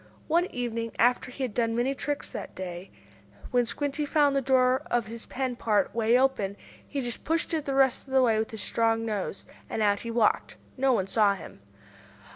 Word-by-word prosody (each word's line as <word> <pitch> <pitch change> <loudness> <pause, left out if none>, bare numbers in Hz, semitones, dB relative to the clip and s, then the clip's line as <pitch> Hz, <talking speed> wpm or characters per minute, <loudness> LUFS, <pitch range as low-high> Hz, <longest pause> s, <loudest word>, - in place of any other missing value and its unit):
One 340 +3 +2
evening, 230 -4 -3
after 245 +1 +3
he 265 +2 -5
had 245 -5 -2
done 230 0 0
many 245 +3 +1
tricks 290 +1 -3
that - - -7
day, 180 0 -6 0.6
when 245 -1 +2
Squinty 290 +4 -2
found 290 -1 +3
the 275 - +2
door 260 0 +3
of 240 -2 +1
his 230 +1 -6
pen 260 -1 -2
part 215 -3 +1
way 230 +1 +3
open, 210 -7 +1 0.3
he 280 - -3
just 240 -2 -3
pushed 330 +1 0
it 310 -2 -1
the 275 - -1
rest 270 0 +2
of - - -12
the 265 -1 +5
way 225 -3 +3
with 220 - -1
his 220 -3 -5
strong 225 +1 +1
nose, 205 -3 -3 0.2
and 220 - -1
out 205 -1 +3
he 230 - -6
walked! 230 -2 +1 0.2
No 270 0 +2
one 200 -7 +2
saw 200 0 +3
him. 190 - -11
240 Hz, 205 wpm, -27 LUFS, 220-270 Hz, 0.6 s, the